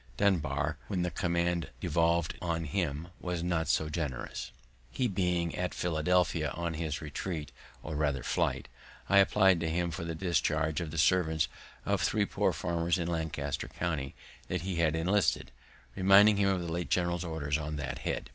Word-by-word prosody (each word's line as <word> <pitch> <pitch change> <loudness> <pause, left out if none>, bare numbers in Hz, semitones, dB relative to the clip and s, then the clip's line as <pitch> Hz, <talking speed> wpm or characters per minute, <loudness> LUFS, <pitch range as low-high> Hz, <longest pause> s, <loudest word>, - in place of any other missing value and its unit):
Dunbar, 80 -9 +1
when 95 -4 -1
the 90 - -1
command 85 0 0
devolv'd 85 -1 +1
on 85 -1 -1
him, 80 -1 -2
was 90 -2 -3
not 85 -3 0
so 80 0 +2
generous. 75 -5 -4 0.4
He 125 - 0
being 90 -4 0
at 90 0 -2
Philadelphia, 90 +1 +1
on 85 -1 -2
his 80 -1 -3
retreat, 75 0 -4 0.3
or 75 - -5
rather 75 -3 0
flight, - - 0 0.4
I 100 - +6
apply'd 95 -2 +5
to 80 -1 -1
him 85 +1 0
for 80 - -5
the 85 -1 -4
discharge 80 -3 0
of 85 - -4
the 80 - -6
servants 80 -1 +3 0.4
of - - +1
three - - +2
poor - - +1
farmers 85 0 0
of 85 -1 -2
Lancaster 80 -4 -2
county 75 -6 -3 0.3
that 90 -2 -2
he 95 -2 -3
had 80 -2 +2
enlisted, 95 +5 +1 0.4
reminding 100 +2 +6
him 100 -1 +3
of 95 -2 +1
the 85 -1 -4
late 85 +1 -3
general's 85 -1 +1
orders 80 -3 -2
on 75 0 -4
that 70 - -4
head. - - -3
85 Hz, 170 wpm, -31 LUFS, 80-90 Hz, 0.4 s, I